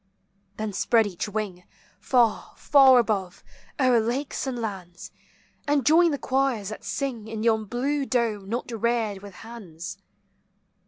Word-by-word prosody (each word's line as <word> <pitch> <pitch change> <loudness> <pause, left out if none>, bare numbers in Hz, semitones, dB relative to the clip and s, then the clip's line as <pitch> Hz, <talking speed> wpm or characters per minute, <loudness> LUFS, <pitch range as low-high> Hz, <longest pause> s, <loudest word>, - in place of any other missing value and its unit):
Then 215 -1 -3
spread 225 +3 +3
each 200 0 -4
wing 205 -4 -4 0.4
Far, 240 -4 +1
far 270 -3 +6
above, 205 -6 -1 0.4
o'er 255 -3 +4
lakes 255 +5 -2
and 255 -2 -3
lands, 185 -6 -6 0.6
And 285 -3 +2
join 335 +3 +5
the 290 - -1
choirs 260 -6 0
that 215 - -8
sing 250 -6 -3
In 220 -1 -5
yon 220 -2 +2
blue 270 +5 -1
dome 220 -6 -1
not 240 +2 -3
reared 225 -3 -1
with 200 -2 -11
hands. 195 -7 -9
230 Hz, 140 wpm, -25 LUFS, 205-260 Hz, 0.6 s, far